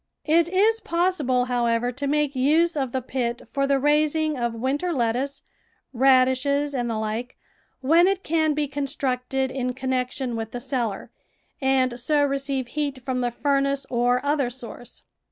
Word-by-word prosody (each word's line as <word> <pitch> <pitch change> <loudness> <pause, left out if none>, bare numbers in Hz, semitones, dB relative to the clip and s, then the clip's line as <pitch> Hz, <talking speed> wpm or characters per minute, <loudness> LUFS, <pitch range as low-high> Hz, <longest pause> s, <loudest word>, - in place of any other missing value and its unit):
It 330 +2 +3
is 425 +5 +3
possible, 330 - +1
however, 240 -1 0
to 280 +3 -4
make 295 -1 0
use 315 +6 +3
of 265 -4 -1
the 260 -1 -2
pit 240 -2 -3
for 275 0 +1
the 275 0 +3
raising 300 +2 +2
of 235 -2 -2
winter 275 +9 -1
lettuce, 260 +1 -1 0.5
radishes, 265 +3 +3
and 245 -3 -1
the 225 - -2
like, 220 +3 -4 0.4
when 330 +7 +5
it 390 -1 0
can 315 -2 +1
be 295 -1 0
constructed 270 -2 -2
in 255 -1 -2
connection 255 -1 -2
with 225 0 -5
the 245 - -3
cellar, 240 -5 -3 0.5
and 260 -2 +1
so 290 +4 +2
receive 275 -2 -2
heat 280 -4 -3
from 260 -2 -1
the 245 -1 0
furnace 275 +2 0
or 245 +2 +1
other 285 -3 +1
source. 245 -1 -10
265 Hz, 155 wpm, -24 LUFS, 245-290 Hz, 0.5 s, when